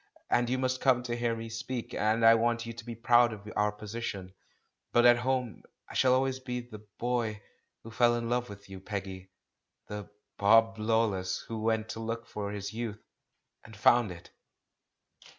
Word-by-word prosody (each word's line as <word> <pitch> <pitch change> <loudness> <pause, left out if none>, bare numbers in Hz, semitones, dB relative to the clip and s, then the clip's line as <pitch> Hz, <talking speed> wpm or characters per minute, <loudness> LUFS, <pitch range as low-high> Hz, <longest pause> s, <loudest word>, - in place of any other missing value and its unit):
— - - -41
and 120 0 +2
you 130 - +1
must 130 0 -1
come 125 -2 +3
to 120 -1 -3
hear 120 -1 0
me 115 0 -6
speak, 115 +2 -5
and 110 +2 +2
I 115 - +9
want 115 +1 +1
you 115 - -6
to 115 +1 -9
be 120 0 -7
proud 120 +1 +4
of 105 -1 -9
our 105 0 +2
position; 105 -3 -6 0.6
but 120 0 +4
at 120 0 +8
home 125 -2 -1 0.3
I - - -11
shall 130 -1 +4
always 130 0 0
be 125 -1 -4
the 120 -3 -10 0.2
'boy' 115 -4 -1 0.4
who 115 - -10
fell 120 0 +3
in 115 -1 -2
love 120 0 -1
with 100 0 -11
you, 95 -1 -9
Peggy, 95 -1 -6 0.6
the 105 -1 -7 0.3
'Bob 115 +2 +5
Lawless' 110 -4 0
who 110 -1 -4
went 110 0 0
to 110 - -5
look 115 +1 -4
for 105 -3 -5
his 100 0 -5
youth 110 -2 -5 0.3
— - - -53
and 110 -1 -13
found 120 0 +4
it!" 85 -1 -12
115 Hz, 190 wpm, -30 LUFS, 105-120 Hz, 0.6 s, I